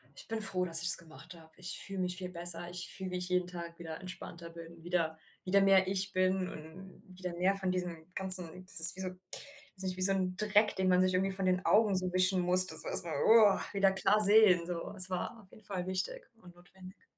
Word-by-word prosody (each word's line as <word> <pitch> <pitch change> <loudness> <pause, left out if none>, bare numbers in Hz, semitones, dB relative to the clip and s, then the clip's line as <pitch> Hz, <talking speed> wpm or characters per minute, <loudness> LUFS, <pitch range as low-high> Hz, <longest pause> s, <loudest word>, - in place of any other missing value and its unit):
ich - - -12
bin 225 0 -8
froh, 185 -4 -3
dass 165 -1 +8
ich's 175 - +1
gemacht 165 +2 -17
habe. 160 -1 -22
Ich 180 -1 -4
fühle 195 -1 -9
mich 180 0 -4
viel 185 - -10
besser. 175 0 +1
Ich 175 0 -7
fühle 190 -1 -11
mich 180 0 -6
jeden 180 -1 -5
Tag 170 -1 -13
wieder 160 -2 -12
entspannter, 170 -2 -12
bin 165 0 -17
wieder 165 -2 -6 0.3
wieder 200 +2 -2
mehr 195 -1 -1
ich, 195 +1 -2
bin 185 0 -5
und 175 +4 -17
wieder 185 -1 -12
mehr 190 +2 -3
von 190 -2 -7
diesen 175 -2 -10
ganzen 185 -1 +5
das 185 - -2
ist 170 +1 +12
wie - - -8
so 185 - -8
weiß 190 +6 -9
nicht, 185 -1 -7
wie - - -9
so 195 - +5
'n 185 -1 -6
Dreck, 210 +1 -2
den 190 -1 -5
man 180 0 -1
sich 185 0 -3
irgendwie 190 +1 -4
von 190 -1 -7
den 185 0 -5
Augen 210 -2 -2
so 185 -1 -3
wischen 185 0 -2
muss, 180 +1 +7
dass 160 -3 -4
man - - -10
erst - - +2
mal 165 - -9
woa, 220 -3 +1
wieder 195 -1 -3
klar 195 +2 -3
sehen, 205 -4 +4
so. 175 -2 -10
Es 185 0 +7
war 185 +5 -9
auf 190 - -27
jeden 215 - -22
Fall 185 -2 -10
wichtig - - -8 0.2
und 175 -1 -20
notwendig. 185 +1 -21
185 Hz, 240 wpm, -27 LUFS, 175-190 Hz, 0.3 s, ist